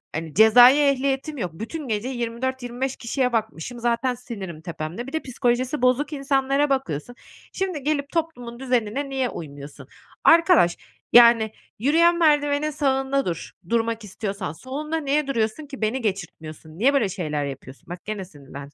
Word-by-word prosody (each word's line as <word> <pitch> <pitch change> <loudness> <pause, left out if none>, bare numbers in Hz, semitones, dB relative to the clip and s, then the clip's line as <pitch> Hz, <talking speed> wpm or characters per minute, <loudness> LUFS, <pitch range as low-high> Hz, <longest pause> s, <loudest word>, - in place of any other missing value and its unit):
hani, 160 -1 -5
cezai 245 - +8
ehliyetim 275 +1 +1
yok. 180 -8 -3
Bütün 265 - -6
gece 220 +1 -2
24-25 245 +1 -3
kişiye 250 +1 -1
bakmışım, 220 0 -3
zaten 240 +2 0
sinirim 200 -10 -8
tepemde. 170 +7 -6
Bir 270 - -9
de 315 - -1
psikolojisi 250 +2 -1
bozuk 260 +4 +2
insanlara 275 0 +1
bakıyorsun. 245 - -2 0.4
Şimdi, 370 -7 -3
gelip 285 -1 -1
toplumun 245 -8 -4
düzenine 255 +1 -1
niye 265 -2 -1
uymuyorsun? 145 -2 -9 0.4
Arkadaş, 330 - +5 0.4
yani, 235 -2 +7 0.3
yürüyen 335 +8 +4
merdivenin 295 -2 +2
sağında 270 -1 0
dur, 170 -2 -4 0.2
durmak 230 -1 0
istiyorsan. 200 -3 -5
Solunda 295 - -4
niye 295 -1 0
duruyorsun 230 +2 -1
ki? 275 -3 -10
Beni 220 +5 0
geçirtmiyorsun. 165 -6 -5
Niye 265 +6 +4
böyle 235 -8 +2
şeyler 155 -6 -3
yapıyorsun? 135 -1 -9
Bak, 175 0 -8
gene 210 -2 -4
sinirlendim. 140 -3 -12
245 Hz, 145 wpm, -23 LUFS, 200-275 Hz, 0.4 s, cezai